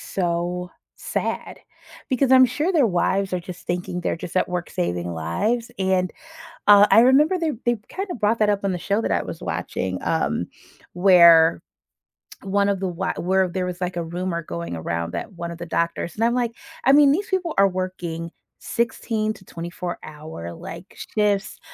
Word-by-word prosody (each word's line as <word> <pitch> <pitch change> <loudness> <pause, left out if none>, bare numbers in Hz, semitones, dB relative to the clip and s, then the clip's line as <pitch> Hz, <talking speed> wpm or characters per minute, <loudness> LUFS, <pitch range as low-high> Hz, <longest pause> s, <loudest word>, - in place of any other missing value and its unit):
so 180 - -2 0.3
sad, - - -3 0.5
because 260 0 +1
I'm 260 0 +8
sure 300 +9 -1
their 300 -8 +4
wives 190 0 0
are 180 - 0
just 180 0 -10
thinking 180 0 -3
they're 175 - -1
just 170 +2 -7
at - - +2
work 180 -1 -3
saving 85 0 -2
lives, 215 - -1
and, 185 -1 +1 0.5
uh, 205 0 +8
I - - +8
remember 290 +9 +5
they 320 -3 0
they 240 0 +2
kinda 385 -1 -4
brought 225 0 +1
that 215 - +4
up 200 -1 -1
on 195 - +1
the 180 - -2
show 200 +5 0
that - - -1
I - - +1
was - - -7
watching, - - -3
um, - - 0 0.5
where 170 -3 +6 0.8
1 200 +1 +1
of 195 - 0
the 190 - 0
wi 180 +2 -2
were 190 +1 +2
there 185 +1 -2
was 180 -1 -5
like 180 0 -2
a 170 - -1
rumor 170 +1 -3
going 85 - -5
around 85 +1 -3
that 85 - -4
1 170 -1 -5
of 170 - -8
the 170 - -5
doctors 170 +1 -2
and 225 - -1
I'm, 235 - +2
like 240 -2 0 0.3
I 270 - +5
mean 285 0 +7
these 400 +7 -1
people 365 -4 -1
are 195 0 +6
working 175 -3 -4 0.3
16 225 -2 -1
to 190 - -17
24 175 +1 -6
hour, 150 - -8
like, 170 - -10 0.2
shifts, 210 0 +1
185 Hz, 185 wpm, -23 LUFS, 170-225 Hz, 0.8 s, I'm